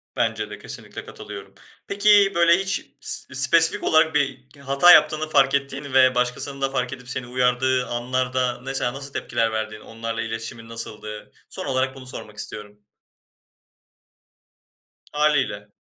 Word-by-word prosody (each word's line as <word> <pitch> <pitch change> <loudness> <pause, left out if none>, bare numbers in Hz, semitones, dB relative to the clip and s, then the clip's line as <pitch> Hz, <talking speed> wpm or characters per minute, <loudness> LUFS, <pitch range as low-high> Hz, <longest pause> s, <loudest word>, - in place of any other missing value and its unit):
Bence - - -1
de - - -8
kesinlikle - - -8
katılıyorum. - - -10 0.3
Peki 200 0 +4
böyle 170 0 +5
hiç 190 0 -1 0.2
s 130 - -4
spesifik 160 +5 +5
olarak 160 -1 +3
bir 140 -3 -1
hata 140 +5 +5
yaptığını 155 -1 +4
fark 135 -2 +3
ettiğin 140 0 -4
ve 130 -1 +5
başkasının 125 +3 -2
da 135 - +1
fark 130 -2 -2
edip 125 -1 -8
seni 130 -1 -3
uyardığı 125 +1 +1
anlarda, 125 +1 -2
mesela, 135 -2 -2
nasıl 135 0 -8
tepkiler 115 0 -1
verdin? 110 -1 -4
Onlarla 115 +1 -6
iletişimin 115 0 -6
nasıldı? 110 -2 -7 0.2
Son - - -6
olarak 130 0 -1
bunu 130 -1 -11
sormak 105 -4 -9
istiyorum. 105 -1 -9 2.3
Hâliyle. 140 -9 0
130 Hz, 135 wpm, -22 LUFS, 120-140 Hz, 2.3 s, böyle